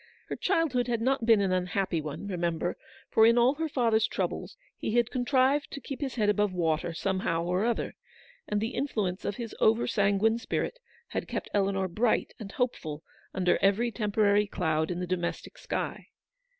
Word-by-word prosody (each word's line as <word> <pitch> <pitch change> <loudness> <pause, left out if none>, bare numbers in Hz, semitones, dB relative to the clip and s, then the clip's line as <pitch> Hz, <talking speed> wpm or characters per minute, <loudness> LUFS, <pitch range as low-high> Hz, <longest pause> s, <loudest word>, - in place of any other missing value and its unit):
Her - - -2
childhood 320 -10 +1
had 235 -2 0
not 250 0 0
been 225 -3 +6
an 195 -2 +1
unhappy 185 -1 0
one, 150 +4 -6
remember; 175 -2 -1 0.4
for 220 - +5
in 230 +1 +5
all 240 +3 +5
her 320 +2 -3
father's 230 -5 +2
troubles, - - -3 0.2
he 220 - -2
had 240 -1 +2
contrived 260 +3 +2
to 280 - -6
keep 275 +2 -7
his 270 -3 -3
head 215 -4 +1
above 210 -1 +2
water, 165 -1 0
somehow 170 -1 -1
or 180 +3 0
other, 235 -1 -1 0.5
and 210 - 0
the 220 +2 -1
influence 205 -9 -2
of 200 - -1
his 235 -2 -6
over 225 +2 +4
sanguine 210 +1 +2
spirit - - -3 0.3
had - - -3
kept - - -4
Eleanor 195 -1 +1
bright 215 +6 +1
and 195 -3 -8
hopeful 160 - -2 0.3
under 180 -2 +2
every 210 +5 +3
temporary 210 -2 +2
cloud 160 -5 0
in 175 -1 -2
the 180 - -2
domestic 175 -1 -3
sky. - - -4
210 Hz, 175 wpm, -29 LUFS, 180-240 Hz, 0.5 s, been